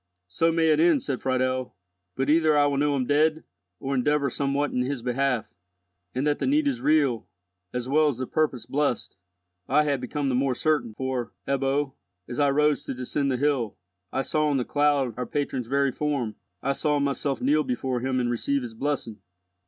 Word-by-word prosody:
"So 165 - +1
may 165 -1 +2
it 155 -1 +4
end," 160 -5 +4
said 135 -3 -3
Friedel, 130 -2 -1 0.4
"but 135 +1 -1
either 155 0 +4
I 145 - +5
will 140 -1 +1
know 145 0 +2
him 130 -2 0
dead, 155 +3 +2 0.4
or 135 +1 -3
endeavour 140 +1 +1
somewhat 140 +2 0
in 125 - 0
his 125 -1 -2
behalf. 125 -1 0 0.6
And 130 +3 0
that 150 -1 +1
the - - -1
need 295 +2 +3
is 270 -3 -1
real, 140 -7 +2 0.4
as 125 0 -3
well 155 +3 +4
as 140 -5 0
the 130 - -2
purpose 135 -6 -1
blessed, 140 -4 -1 0.5
I 150 - +4
have 140 -3 0
become 140 +3 -2
the - - 0
more 130 0 +1
certain, 150 -8 0
for, 130 -1 -3
Ebbo, 135 0 0 0.3
as 120 - -5
I 145 -1 +4
rose 150 +1 +2
to - - -4
descend 135 +2 -1
the 130 - 0
hill, 135 -5 0 0.3
I 135 - -1
saw 155 +1 +1
on 145 -2 +1
the 125 - -1
cloud 145 -4 +2
our 125 -1 -3
patron's 135 -4 -2
very 140 +1 +2
form—I 130 -6 -3
saw 150 +1 +1
myself 140 -1 -1
kneel 150 +4 +2
before 125 -1 -2
him 130 +1 -1
and 120 - 0
receive 140 +3 0
his 120 -2 -6
blessing." 125 -3 -3
140 Hz, 195 wpm, -26 LUFS, 125-150 Hz, 0.6 s, I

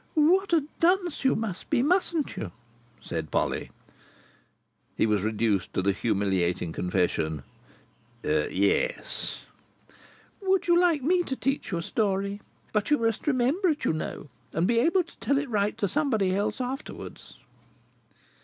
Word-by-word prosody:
"What 350 +6 +4
a 325 -4 +4 0.2
dunce 355 -2 +2
you 265 - +4
must 210 -5 -4
be, 265 -5 +2
mustn't 340 -1 +1
you?" 95 - -5 0.5
said 80 -2 -4
Polly. - - -1 1.3
He - - +3
was 105 -3 +2
reduced 110 -2 0
to 95 - +1
the 100 - +3
humiliating 95 -5 0
confession: 85 -5 0 0.8
"Yes." 100 - 0 1.0
"Would 385 -1 +1
you 345 - +5
like 335 -6 +3
me 355 +5 +3
to 270 -6 -3
teach 270 -4 -2
you 175 - 0
a 170 - -3
story? 200 0 -1 0.3
But 210 +2 +1
you 295 - +5
must 225 +3 -1
remember 285 +8 +2
it, 300 - -1
you - - +2
know, 155 -1 -5 0.2
and 165 - +1
be 230 +3 +3
able 340 +8 +3
to 340 - -19
tell 280 - +1
it 285 +1 -1
right 205 -1 +1
to 200 - +1
somebody 220 -7 +1
else 205 +6 -1
afterwards." 260 +3 -6
225 Hz, 145 wpm, -27 LUFS, -, 1.3 s, you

